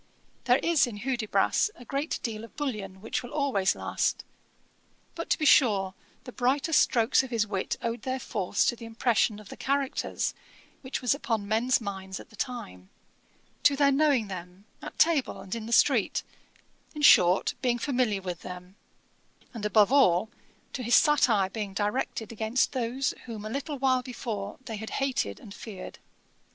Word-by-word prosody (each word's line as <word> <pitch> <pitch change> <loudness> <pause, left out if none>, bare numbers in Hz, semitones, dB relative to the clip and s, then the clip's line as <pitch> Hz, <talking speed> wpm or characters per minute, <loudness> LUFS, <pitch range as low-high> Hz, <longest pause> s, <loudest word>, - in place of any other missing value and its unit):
There 245 0 +5
is 330 -5 +3
in 220 -4 -7
Hudibras 245 - +1
a 245 - -13
great 280 +5 -2
deal 225 -3 -4
of 230 - -12
bullion 210 -10 -4
which 225 - -2
will 245 - -9
always 260 -11 +1
last. - - -1 0.9
But 335 - -6
to - - +3
be 310 - -1
sure 200 -10 +4 0.3
the 250 - -9
brightest 270 +6 +2
strokes 230 +1 +3
of 265 - -7
his 230 -3 +1
wit 195 -2 -3
owed 235 0 -2
their 260 0 -2
force 195 -6 -1
to - - +1
the 235 - -10
impression 225 -1 +1
of 210 - -13
the - - -8
characters, 275 0 -1 0.5
which 260 -1 -5
was 250 - +3
upon 225 -7 -2
men's 230 +4 +2
minds 190 -3 -6
at - - -13
the - - -14
time; 95 - -6 0.7
to 285 - +4
their 280 0 +4
knowing 275 -6 +3
them, 180 +1 -9 0.2
at - - -9
table 320 -5 +2
and 190 - -7
in 225 -1 -4
the - - -6
street; 235 -3 +3 0.7
in 300 - -5
short, 180 -8 +6
being 245 -2 +1
familiar 240 -7 0
with 180 -2 -5
them; 180 +2 -9 0.8
and 215 -3 -3
above 210 +2 +4
all, 220 -7 +4 0.4
to - - -4
his 240 0 +3
satire 240 -10 +4
being 205 -3 -5
directed 215 +1 -2
against 225 +2 0
those 255 +1 -1
whom 220 -3 -7
a 215 - -5
little 285 +3 -4
while 260 -1 +2
before 225 -5 -5
they 225 -2 -5
had 220 +1 -6
hated 260 - -1
and 200 - -11
feared. 200 -5 -9
230 Hz, 170 wpm, -28 LUFS, 205-265 Hz, 0.9 s, short